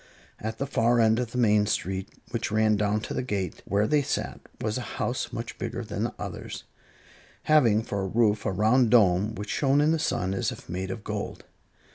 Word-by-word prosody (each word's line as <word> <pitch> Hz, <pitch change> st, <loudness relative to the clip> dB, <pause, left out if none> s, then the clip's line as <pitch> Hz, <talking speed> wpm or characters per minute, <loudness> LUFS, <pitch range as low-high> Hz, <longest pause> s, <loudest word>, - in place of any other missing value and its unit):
At 110 Hz, +1 st, -4 dB
the 140 Hz, -, -2 dB
far 120 Hz, -3 st, +2 dB
end 110 Hz, 0 st, +4 dB
of 125 Hz, -2 st, -2 dB
the 125 Hz, -, -5 dB
main 105 Hz, -3 st, +4 dB
street, 95 Hz, -2 st, -2 dB, 0.2 s
which -, -, -2 dB
ran 110 Hz, 0 st, +3 dB
down 105 Hz, +1 st, +1 dB
to -, -, -5 dB
the -, -, -1 dB
gate 100 Hz, -8 st, -3 dB
where 100 Hz, +2 st, +1 dB
they 145 Hz, +6 st, +3 dB
sat, 135 Hz, -, -3 dB, 0.2 s
was 110 Hz, +3 st, -2 dB
a 125 Hz, -, -7 dB
house 125 Hz, -, -2 dB
much 115 Hz, +1 st, -6 dB
bigger 120 Hz, +1 st, -3 dB
than 105 Hz, +1 st, -2 dB
the -, -, -4 dB
others, -, -, -6 dB, 0.8 s
having 120 Hz, -9 st, +4 dB
for 100 Hz, -3 st, -3 dB
a 95 Hz, -, -2 dB
roof 105 Hz, 0 st, +2 dB
a -, -, +1 dB
round 110 Hz, +5 st, +3 dB
dome 105 Hz, -2 st, +4 dB
which 105 Hz, +1 st, -5 dB
shone 140 Hz, 0 st, +2 dB
in 150 Hz, +2 st, +4 dB
the 165 Hz, -, +1 dB
sun 95 Hz, -10 st, 0 dB
as 95 Hz, -, -1 dB
if -, -, -10 dB
made 95 Hz, +2 st, -4 dB
of 100 Hz, +2 st, -5 dB
gold. -, -, -5 dB
110 Hz, 210 wpm, -27 LUFS, 100-120 Hz, 0.8 s, end